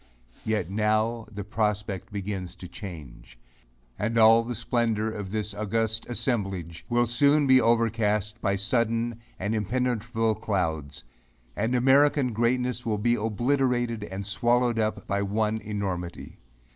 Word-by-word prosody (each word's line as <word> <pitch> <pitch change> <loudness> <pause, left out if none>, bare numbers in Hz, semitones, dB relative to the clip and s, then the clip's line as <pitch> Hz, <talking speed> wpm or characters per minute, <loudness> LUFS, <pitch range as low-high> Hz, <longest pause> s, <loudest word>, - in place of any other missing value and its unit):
Yet 105 -5 -1
now 110 +2 0
the 105 -1 -5
prospect 105 -2 -2
begins 95 -3 -4
to 90 - -9
change; 70 - -10 0.6
and 110 +2 -1
all 115 +1 +7
the 120 +1 -4
splendor 115 -1 0
of 105 -3 -6
this 105 0 -3
august 110 +2 -1
assemblage, 95 -9 -2
will 120 0 +3
soon 140 +5 +3
be 130 -1 +6
overcast 115 -2 +1
by 100 - +1
sudden 115 +2 0 0.2
and 100 +3 -2
impenetrable 115 0 0
clouds; 80 -10 -2 0.5
and 115 +4 0
American 135 0 +4
greatness 125 +2 0 0.2
be 120 +3 +2
obliterated 120 +1 0
and 95 0 -6
swallowed 120 +4 +1
up 110 0 -1
by 100 0 -1
one 105 +2 0
enormity. 95 -5 -5
110 Hz, 125 wpm, -26 LUFS, 100-120 Hz, 0.6 s, all